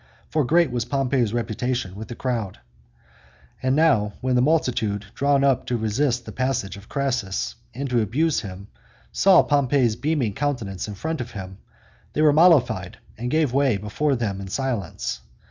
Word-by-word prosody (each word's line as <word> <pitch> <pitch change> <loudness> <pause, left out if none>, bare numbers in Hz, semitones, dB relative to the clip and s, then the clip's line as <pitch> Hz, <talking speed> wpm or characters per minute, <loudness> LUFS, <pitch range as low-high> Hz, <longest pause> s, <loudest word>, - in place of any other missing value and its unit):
For 155 -1 +2
great 165 +2 +3
was 120 -2 -1
Pompey's 130 -3 0
reputation 120 -2 -2
with 110 +2 -7
the 120 - -7
crowd. 115 -7 -3 1.0
And 130 +1 +1
now, 135 -10 +3
when 130 0 -1
the 125 - +4
multitude 125 -8 +1
drawn 140 +1 +2
up 135 -3 +2
to 125 - 0
resist 120 +3 0
the 110 - -7
passage 130 -6 -2
of 100 +1 -14
Crassus, 125 -9 -1 0.2
and 140 +2 -3
to 120 -2 +3
abuse 145 +9 +1
him, 100 -1 -8 0.4
saw 190 -2 +5
Pompey's 135 -5 +2
beaming 130 -3 -1
countenance 115 -9 -3
in 105 - -6
front 160 +8 -3
of 120 0 -7
him, 95 -1 -8 0.5
they 155 - +1
were 150 -2 +6
mollified, 140 - +4 0.2
and 120 +3 -4
gave 155 -3 +1
way 135 -5 +3
before 135 +8 -1
them 100 -5 -2
in 95 - -7
silence. 120 -5 -3
125 Hz, 165 wpm, -23 LUFS, 105-140 Hz, 1.0 s, were